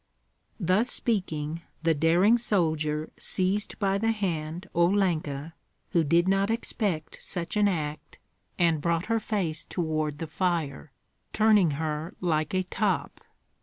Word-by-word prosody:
Thus 190 +6 +2
speaking, 165 -10 -1 0.2
the 165 0 +4
daring 175 +9 +4
soldier 155 -8 0
seized 195 +3 -1
by 195 -1 +1
the 225 +2 +1
hand 175 -4 -3
Olenka, 170 -5 +1 0.4
who 170 - +3
did 170 +4 +3
not 195 +1 +2
expect 205 -7 -2
such 170 +1 -4
an 210 -1 +4
act, 155 -5 -3 0.4
and 165 -3 +2
brought 170 +1 0
her 225 0 +1
face 180 -7 -2
toward 155 -3 -2
the 165 - -4
fire, 160 -3 -2 0.4
turning 210 -7 +4
her 155 0 -3
like 160 -1 0
a 185 - +2
top. 185 -5 -1
170 Hz, 130 wpm, -27 LUFS, 155-195 Hz, 0.4 s, the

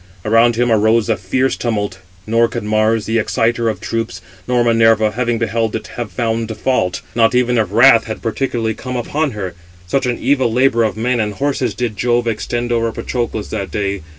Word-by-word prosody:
Around 115 +2 +4
him 120 +1 +1
arose 110 +1 +3
a 110 - +3
fierce 130 +8 0
tumult; 105 -5 -2 0.3
nor 115 +1 +3
could 120 -1 -5
Mars, 110 +1 +1
the 115 +1 +1
exciter 115 +1 0
of 105 -5 -4
troops, 115 +1 -3 0.3
nor 125 -1 +2
Minerva, 115 -2 +3
having 120 0 -1
beheld 115 0 -1
it, 110 - -5
have 120 -4 -6
found 115 +2 -2
fault, 125 -9 0
not 115 +1 +3
even 125 0 +2
if 110 - +1
wrath 115 +2 +6
had 110 -1 -5
particularly 115 -1 -2
come 125 +3 -6
upon 140 +3 -1
her; 95 -4 -5 0.3
such 130 +8 0
an 120 - -1
evil 130 -2 +1
labour 120 -1 +3
of 110 - -3
men 120 +2 0
and 105 -2 -1
horses 135 -5 -1
did 115 -2 -3
Jove 120 +1 +1
extend 120 +2 -2
over 115 -1 +1
Patroclus 120 -3 -4
on - - -1
that 100 - -5
day. 100 -1 -2
115 Hz, 195 wpm, -17 LUFS, 110-120 Hz, 0.3 s, wrath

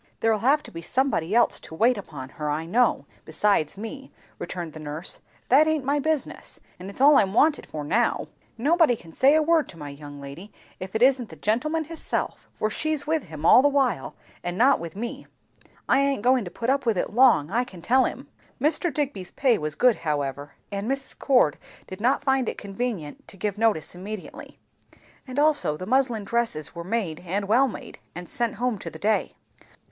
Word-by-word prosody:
"There'll 225 -1 +2
have 280 +7 +3
to - - -11
be 165 - -7
somebody 220 -5 0
else 240 - +4
to 160 - -10
wait 235 +8 +3
upon 145 - -8
her, 150 +1 -5
I 155 +2 -2
know, 240 +9 +2 0.2
besides 195 -6 +1
me," 265 +6 -8 0.3
returned 170 -4 -5
the 155 - -9
nurse. 155 +3 -4 0.3
"That 290 +5 +6
aint 310 -4 0
my 285 +2 +1
business. 310 0 -3 0.2
And 185 +2 -8
it's 200 - -6
all 285 +1 +7
I'm 195 -1 +2
wanted 300 +4 +3
for 150 -1 -6
now. 225 +11 0 0.3
Nobody 305 +1 +3
can 165 -6 -15
say 275 - +5
a 315 - +4
word 320 -3 +2
to 170 - -11
my 145 -2 -7
young 145 0 -10
lady 140 +9 -10 0.3
if 190 +3 -7
it 220 - +3
isn't 255 -3 +3
the - - -10
gentleman 305 +10 0
hisself; 325 +1 -4
and 215 - 0
she's 310 -2 0
with 315 -1 0
him 155 -1 -7
all 250 - +8
the 285 - +4
while, 275 -2 0 0.3
and 175 +1 -3
not 265 +5 +4
with 165 0 -7
me. 235 +4 -6 0.6
I 270 - +4
aint 275 -6 +1
goin' 250 -2 +3
to - - -6
put 230 +8 -1
up 275 0 0
with 230 -5 +1
it - - -2
long, 235 - +4
I 240 +4 +2
can 185 -9 -12
tell 260 +6 +4
'em." - - -8 0.3
Mr. 325 +3 +2
Digby's 265 -10 -3
pay 255 -5 +2
was 155 -1 -3
good 250 +5 +4
however, 145 -2 -3 0.2
and 200 +3 -3
Mrs. 270 0 -3
Cord 245 - +3 0.3
did 190 +2 -9
not 255 +5 +2
find 265 -3 +1
it - - -6
convenient 200 -6 -5
to - - -10
give 210 +1 -3
notice 220 -9 +1
immediately; 195 +3 -8 0.7
and 255 +1 -7
also 290 - +2
the 185 - -6
muslin 245 -1 +1
dresses 230 -9 -2
were 170 -1 -6
made 185 -5 -2
and 195 +3 -3
well 250 +6 +4
made, 245 - -9 0.2
and 175 0 -7
sent 235 -2 -1
home 240 -1 -1
to 170 - -6
the 160 - -10
day. 210 +6 0
225 Hz, 205 wpm, -25 LUFS, 175-265 Hz, 0.7 s, all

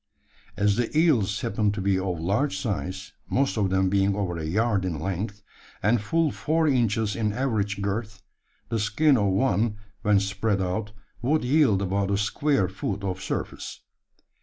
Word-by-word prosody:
As 100 +1 +2
the 120 +5 -1
eels 115 - +3
happened 105 0 0
to - - -4
be 95 0 +1
of 90 -3 -2
large 100 - 0
size 95 -1 -4 0.2
most 135 +1 +1
of 100 -4 +1
them 95 0 +2
being 100 +1 +2
over 95 -4 -2
a 80 -1 -4
yard 105 +3 +1
in 85 -5 -2
length, 100 +4 -4 0.4
and 110 +2 +3
full 160 +8 +1
four 160 +1 0
inches 115 -5 +1
in 110 -2 0
average 105 -6 -1
girth 100 0 -3 0.5
the 115 - 0
skin 135 +8 +3
of 105 -4 +2
one 105 +1 +1 0.3
when 105 -1 +4
spread 100 +1 -1
out 105 +3 -2 0.3
would 150 +4 +1
yield 125 -7 +3
about 100 +1 0
a 100 - +1
square 125 +2 +1
foot 95 +1 -4
of 95 -1 -3
surface. - - -5
105 Hz, 165 wpm, -26 LUFS, 95-115 Hz, 0.5 s, when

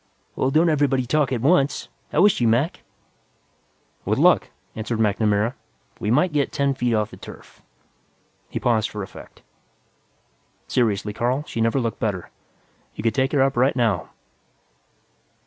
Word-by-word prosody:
"Well, 130 - +1
don't 160 +5 +3
everybody 140 -5 +2
talk 140 +1 +1
at 120 -3 -1
once. 145 0 +2 0.2
How 175 +6 +4
is 210 - +7
she, 120 -9 0
Mac?" 125 +10 +1 1.2
"With - - 0
luck," - - +4 0.3
answered 110 +1 -3
MacNamara, 105 +1 +1 0.5
"we 105 - -2
might 150 +8 +2
get 145 -2 0
ten 140 0 +1
feet 125 -3 0
off 105 -1 -1
the - - -11
turf." - - -13 0.9
He - - -4
paused 110 -3 +1
for 105 -1 -5
effect. - - -13 1.2
"Seriously, 105 -4 0
Carl, 125 +6 -1
she 115 - -4
never 115 +4 +2
looked 115 -3 -3
better. 95 -5 -3 0.6
You - - -6
could 115 -2 +1
take 130 +3 +1
her 140 -3 +3
up 135 0 0
right 130 +3 +2
now. 110 - 0
120 Hz, 150 wpm, -23 LUFS, 110-140 Hz, 1.2 s, is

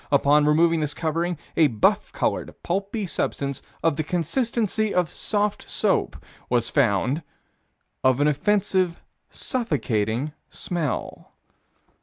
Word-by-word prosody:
Upon 145 +1 +4
removing 165 +2 +4
this 150 -1 -1
covering, 165 +1 -1 0.2
a 160 - +5
buff 110 -6 +1
colored, - - -2
pulpy 195 +4 -2
substance 140 -6 -2 0.2
of 165 -3 +2
the 155 - 0
consistency 215 - 0
of 180 -2 +1
soft 210 -1 -1
soap, - - +1 0.3
was 120 -1 +1
found 130 - +2 0.8
"of 130 0 +4
an 145 - +4
offensive, 185 +2 +1 0.3
suffocating 130 - -1 0.2
smell." 165 -6 -4
160 Hz, 110 wpm, -24 LUFS, 140-190 Hz, 0.8 s, a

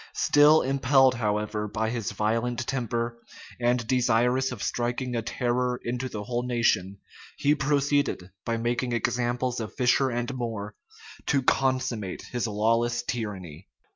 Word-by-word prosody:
Still 150 +2 +5
impelled, 135 -1 +4
however, 105 -2 -1
by 110 +2 -2
his 115 -4 -3
violent 115 +4 -1
temper, 120 -2 -2 0.4
and 120 -1 +1
desirous 125 +1 +2
of 120 -5 -6
striking 120 +1 -2
a 115 - 0
terror 125 +2 -1
into 125 +2 -3
the 105 -3 -5
whole 120 +1 -2
nation, 115 -6 0 0.4
he 145 - +3
proceeded, 140 -9 0
by 115 0 -1
making 120 +2 -1
examples 120 +2 -1
of 110 -2 -6
Fisher 130 +1 +3
and 120 +2 -2
More, 115 -5 -4 0.5
to 140 -3 +2
consummate 130 -7 0
his 120 -1 -1
lawless 115 +3 +1
tyranny. 95 -9 -5
120 Hz, 135 wpm, -26 LUFS, 110-130 Hz, 0.5 s, Still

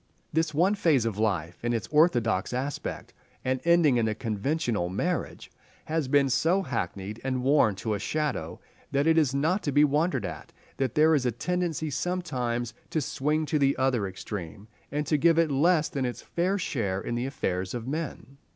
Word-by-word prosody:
This 160 0 +1
one 175 +7 +3
phase 160 - +2
of 110 -3 -2
life 90 -6 -1
in 120 0 0
its 115 - -1
orthodox 120 - +2
aspect, 135 +3 -4 0.3
and 130 0 0
ending 170 -6 +4
in 115 -2 +2
the 110 - -1
conventional 110 - -1
marriage, 165 - -3 0.3
has 155 -3 -1
been 140 +1 +4
so 165 +9 +2
hackneyed 105 - -4
and 130 -1 -1
worn 135 -7 +4
to 110 +3 -2
a 105 - -2
shadow, 120 - -2 0.3
that 140 +1 +1
it 160 0 +4
is 145 -5 +2
not 165 +8 +1
to 145 - -1
be 145 +2 +5
wondered 150 - +1
at - - -7 0.2
that 135 -4 -1
there 155 +1 +5
is 135 -5 +2
a - - +1
tendency 160 +4 -2
sometimes 125 -10 -2 0.2
to 160 - 0
swing 150 +2 -1
to 150 0 0
the 140 -1 +2
other 125 -6 +1
extreme, 95 0 -7 0.2
and 150 +1 -1
to 150 +1 +2
give 165 +2 +4
it 165 -2 +3
less 155 +3 +3
than 135 - -3
its 125 -1 -4
fair 185 +4 0
share 105 - -2
in 120 - -4
the 120 +2 -1
affairs 95 -7 -2
of 120 0 -5
men. 140 -3 -5
135 Hz, 190 wpm, -27 LUFS, 115-155 Hz, 0.3 s, be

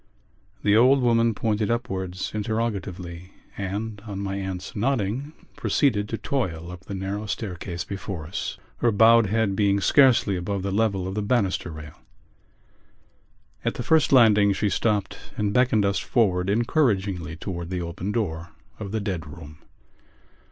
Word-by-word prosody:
The 105 0 +4
old 130 +5 +6
woman 115 -2 +3
pointed 105 -1 0
upwards 95 -6 -3
interrogatively 100 -5 -3 0.2
and, 105 +2 -4
on 100 -2 -5
my 100 0 -3
aunt's 95 -2 -5
nodding, 120 +3 -1 0.2
proceeded 105 -8 +1
to 115 - -2
toil 85 -13 -3
up 90 +1 -11
the 100 - -5
narrow 100 +3 -4
staircase 90 -5 -4
before 95 -4 -6
us, 85 - -4 0.2
her 120 - +2
bowed 115 +1 +6
head 110 -1 +1
being 100 -1 +2
scarcely 125 -4 +4
above 95 +2 -3
the 100 - -2
level 100 -3 0
of 95 - -4
the 105 - -2
banister 100 -5 0
rail. 75 -2 -10 1.6
At - - -1
the - - -4
first 160 -2 +3
landing 105 -6 +6
she 105 +1 0
stopped 105 -1 0 0.2
and 105 -1 0
beckoned 120 -4 +3
us 100 0 +1
forward 95 -6 +1
encouragingly 100 - +1
towards 85 -1 -5
the 90 -1 -3
open 90 +4 -4
door 90 -7 -3 0.3
of 100 -3 -6
the 110 - -1
dead 90 -7 -3
room. 75 0 -11
100 Hz, 150 wpm, -25 LUFS, 95-110 Hz, 1.6 s, old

